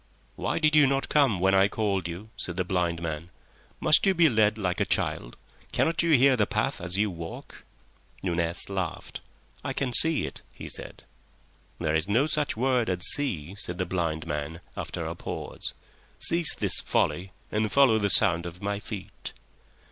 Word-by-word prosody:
"Why - - -2
did 155 -1 +2
you 150 -2 +6
not 135 0 -1
come 135 -10 +3
when 95 +2 +2
I 95 0 +5
called 100 -4 -2
you?" 90 +6 -8
said 85 0 -4
the 95 - +1
blind 85 -2 -1
man. 80 +1 -5 0.5
"Must 155 - +4
you 195 -1 +3
be 165 -2 +5
led 110 -2 +2
like 90 -4 -2
a - - +5
child? - - -2 0.4
Cannot 165 0 +1
you 165 -1 +2
hear 135 0 +5
the 105 -4 +1
path - - -2
as 90 +2 -1
you 105 0 +1
walk?" 85 -1 -9 0.6
Nunez 85 -2 -2
laughed. 95 -4 -5 0.4
"I - - -3
can 130 -3 -2
see 160 +5 +4
it," - - -8
he - - -10
said. - - -7 0.8
"There 75 - -1
is 80 +4 0
no 120 +7 +3
such 150 -6 -1
word 125 -2 +1
as 90 -1 +3
see," 95 - +1
said 90 -4 -3
the 90 - -1
blind 85 -3 -2
man, 75 +2 -5
after - - -5
a - - -4
pause. - - -6 0.4
"Cease 170 -1 +3
this - - +4
folly 95 +1 -1 0.2
and 105 0 -1
follow 130 -6 +4
the 100 -1 0
sound 85 -1 +4
of 85 +1 -10
my 100 +1 -3
feet." 105 -2 -8
100 Hz, 180 wpm, -26 LUFS, 85-130 Hz, 0.8 s, you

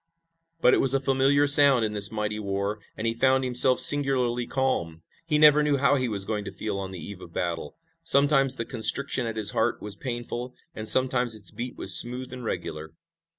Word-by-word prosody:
But 125 - +3
it - - +1
was 135 0 +5
a - - +1
familiar 135 +1 0
sound 140 -4 +6
in 105 - -5
this 100 0 +1
mighty 105 -1 -5
war, 100 +1 -5 0.2
and 110 - -6
he 115 - -1
found 130 +2 0
himself 125 0 +3
singularly 125 -3 +3
calm. 85 -12 -4 0.2
He 150 -2 0
never 150 0 +5
knew 150 -1 0
how 140 +1 +1
he 130 -3 -2
was 100 -3 -3
going 105 -1 -5
to - - -8
feel 105 -2 -6
on 95 -1 -7
the 95 - -10
eve 90 +3 -10
of 85 - -14
battle. 85 -4 -5 0.3
Sometimes 140 -1 +2
the 115 - -6
constriction 125 +2 -2
at 115 -1 -7
his 105 -1 0
heart 115 +2 -2
was 105 -1 -7
painful, 120 +1 -7 0.2
and 110 0 -6
sometimes 125 -2 +2
its 105 -4 -11
beat 120 +1 -8
was - - +6
smooth 125 +1 -4
and 125 -1 -10
regular. 80 -7 -7
120 Hz, 205 wpm, -24 LUFS, 105-135 Hz, 0.3 s, sound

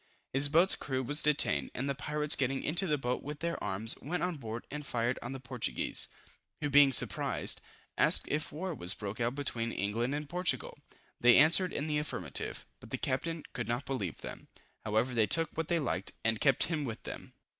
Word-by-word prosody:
His 135 +2 +1
boat's 170 +6 +5
crew 130 -1 -3
was 145 +4 +2
detained, 110 - +2
and 135 - -3
the 140 - 0
pirates 150 +2 -2
getting 135 0 -1
into 175 +5 +1
his 150 -2 +1
boat 125 -2 -2
with 145 +1 -7
their 170 0 -3
arms, 105 +3 +5
went 175 +6 -3
on 180 -3 -2
board 115 -3 -7
and 150 +1 -5
fired 120 -2 -2
on 120 - -6
the 135 - -6
Portuguese, 125 -1 -3 0.5
who 145 -1 -2
being 140 -1 +7
surprised, - - +4 0.4
asked - - +3
if 150 +1 -2
war 180 +4 -4
was 90 - +1
broke 105 +1 -6
out 120 +2 -1
between 115 -5 -2
England 115 +7 -2
and 150 0 -5
Portugal? 180 +3 -1 0.4
They 120 0 +6
answered 165 +5 +6
in 145 - -3
the 150 -1 0
affirmative, 90 - -2
but - - -14
the - - -3
captain 165 +5 -3
could 125 -4 -4
not 120 +4 -2
believe 105 - -4
them. - - -9 0.4
However 110 +4 0
they 110 -3 +2
took 165 - +3
what 165 -1 -2
they 170 - +1
liked, 100 - -3
and 115 -1 0
kept 135 -2 +3
him 160 -2 -2
with 115 -4 -6
them. - - -9
135 Hz, 200 wpm, -31 LUFS, 115-150 Hz, 0.5 s, being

